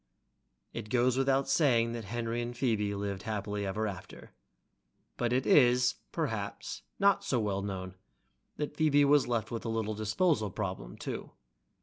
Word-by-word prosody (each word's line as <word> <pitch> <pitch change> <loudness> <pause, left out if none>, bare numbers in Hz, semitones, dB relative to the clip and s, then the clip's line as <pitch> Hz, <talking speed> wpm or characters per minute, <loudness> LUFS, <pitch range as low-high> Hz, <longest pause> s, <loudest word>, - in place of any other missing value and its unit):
It 105 - -6
goes 125 +1 +3
without 135 +1 +2
saying 125 -5 +3
that 115 -2 -5
Henry 115 +3 -2
and 120 +1 -4
his - - -14
Phoebe 105 -6 +1
lived 100 -1 -3
happily 105 -2 -3
ever 105 +3 -1
after, 95 -2 -7 0.8
but 120 -1 -1
it 130 +1 +1
is 125 -3 +5 0.2
perhaps - - -3 0.2
not 200 0 +3
so 135 -11 0
well 100 -3 -1
known 95 -2 -5 0.6
that 150 0 -3
Phoebe 145 -2 +4
was 140 -3 +4
left 115 -3 -1
with 115 - -4
a 115 - -3
little 110 -1 -1
disposal 110 - +1
problem, 90 - -5
too. - - -5
115 Hz, 155 wpm, -31 LUFS, 105-130 Hz, 0.8 s, is